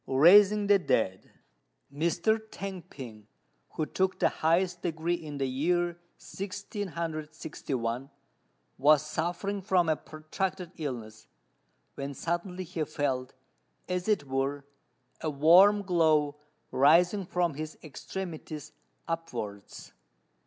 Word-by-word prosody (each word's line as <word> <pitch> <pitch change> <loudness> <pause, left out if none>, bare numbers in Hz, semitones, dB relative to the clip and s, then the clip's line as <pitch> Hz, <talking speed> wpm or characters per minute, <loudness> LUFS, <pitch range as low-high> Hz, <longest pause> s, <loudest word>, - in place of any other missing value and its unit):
RAISING 200 +9 +6
THE 200 0 +5
DEAD. 95 - 0 0.6
Mr. 170 +8 +1
T'ang 195 -2 -6
P'ing, 110 -6 -10 0.5
who 155 - 0
took 190 +4 0
the - - +3
highest 175 +2 +1
degree 165 0 -1
in 155 -4 -5
the 135 -1 0
year 175 +6 0 0.2
1661, 160 - -4 0.7
was 150 +2 +5
suffering 175 +6 -2
from 185 -3 +2
a 155 - +3
protracted 165 +4 -4
illness, 115 -7 -6 0.7
when 140 0 -5
suddenly 175 +5 -3
he 165 -2 -3
felt, 140 -4 -2 0.5
as 180 +1 -2
it 210 -9 +2
were, 135 +1 -2 0.6
a 155 - -1
warm 180 +8 +6
glow 155 -5 +2 0.3
rising 175 +8 +4
from 175 -3 0
his 155 +2 -6
extremities 155 -1 -7 0.4
upwards. 115 -12 -6
160 Hz, 105 wpm, -29 LUFS, 140-180 Hz, 0.7 s, RAISING